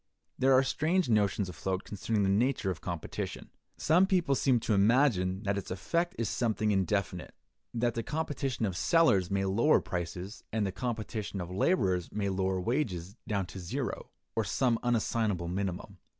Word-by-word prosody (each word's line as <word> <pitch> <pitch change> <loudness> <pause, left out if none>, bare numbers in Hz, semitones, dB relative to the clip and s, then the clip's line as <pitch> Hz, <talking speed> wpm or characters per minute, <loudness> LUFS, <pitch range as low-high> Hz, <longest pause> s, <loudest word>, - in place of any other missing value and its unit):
There 135 +1 +4
are 130 +1 +6
strange 160 +5 +1
notions 105 -2 +2
afloat 95 +2 -3
concerning 105 +1 -1
the - - +2
nature 110 0 +1
of 90 - -7
competition. 85 -3 -5 0.3
Some 175 +5 +4
people 180 -7 +2
seem 130 -2 +3
to 110 - 0
imagine 100 -3 +3
that 100 -1 0
its 95 - -9
effect 170 - -1
is 115 - -1
something 110 -2 0
indefinite; 95 -2 -1 0.4
that 120 0 +1
the 115 - -2
competition 140 -4 -2
of 95 -4 -2
sellers 100 - +3
may 100 0 0
lower 115 +11 +4
prices, 90 +3 -5
and 110 -1 0
the 95 - -1
competition 110 -2 -4
of 90 0 -5
laborers 95 - +1
may 100 -1 -1
lower 95 0 0
wages, 100 - -2
down 100 -3 0
to 95 - -9
zero, 85 -2 -4 0.3
or 115 - +1
some 115 +3 +1
unassignable 110 -6 0
minimum. 95 -2 -4
105 Hz, 165 wpm, -30 LUFS, 95-125 Hz, 0.4 s, are